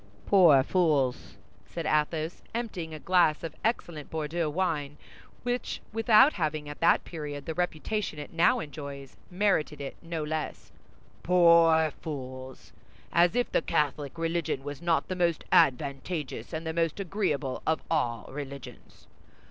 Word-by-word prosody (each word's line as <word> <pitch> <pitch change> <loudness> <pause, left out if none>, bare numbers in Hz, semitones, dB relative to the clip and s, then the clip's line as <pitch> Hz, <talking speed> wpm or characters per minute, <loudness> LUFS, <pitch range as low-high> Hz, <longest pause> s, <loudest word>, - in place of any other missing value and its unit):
"Poor 165 -9 +6
fools!" 150 -7 0 0.3
said 170 -2 -5
Athos, 155 +2 0
emptying 195 -9 -4
a 155 - -6
glass 175 -2 +2
of 165 -2 -5
excellent 170 -9 -2
Bordeaux 160 +1 -2
wine 150 -4 -2 0.5
which, 245 0 -2
without 225 +5 +6
having 155 -4 -2
at 145 - -8
that 165 - +4
period 145 -4 -6
the 160 - -3
reputation 180 +2 -2
it 145 +2 -8
now 165 +1 +4
enjoys, 140 -2 -8
merited 180 -6 0
it 140 -1 -6
no 165 -2 -4
less, 155 0 -4 0.5
"poor 170 -3 +5
fools! 130 -3 -8 0.4
As 175 +4 +4
if 245 0 0
the - - +2
Catholic 145 +1 -1
religion 165 -4 -1
was 145 +1 -7
not 170 -1 +1
the 185 - -3
most 170 -3 0
advantageous 140 -1 +1
and 160 +1 -4
the 160 - -2
most 165 +2 0
agreeable 165 -9 -2
of 160 - +1
all 120 -9 0
religions! 140 -3 -9
160 Hz, 140 wpm, -28 LUFS, 145-175 Hz, 0.5 s, Poor